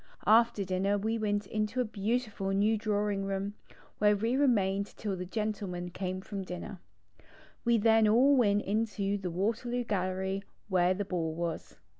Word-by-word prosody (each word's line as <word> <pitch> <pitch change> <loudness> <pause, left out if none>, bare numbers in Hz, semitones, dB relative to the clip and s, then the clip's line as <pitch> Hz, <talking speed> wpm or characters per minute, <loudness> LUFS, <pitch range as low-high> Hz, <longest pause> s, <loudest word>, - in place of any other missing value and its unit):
After 225 -1 +4
dinner 190 +2 +1
we 220 +3 -1
went 205 -1 0
into 215 +4 -2
a 250 - +2
beautiful 215 -1 -2
new 205 +3 +2
drawing 205 -2 -1
room 195 +1 -2 0.2
^ - - -21 0.2
where 210 0 +5
we 225 +5 0
remained 200 -8 +2
till 205 -3 -3
the 180 0 -6
gentlemen 195 -4 -3
came 185 +1 -4
from 200 0 -5
dinner. 185 +1 -7 0.8
We 235 -1 +3
then 220 0 +4
all 255 +6 +5
went 210 -5 +3
into 205 -1 -1
the 185 -2 -3
Waterloo 230 +7 -1
Gallery 190 -2 -1 0.3
where 185 -1 +3
the 200 +1 -3
ball 165 -4 -2
was. 170 -1 -4
205 Hz, 160 wpm, -30 LUFS, 190-220 Hz, 0.8 s, where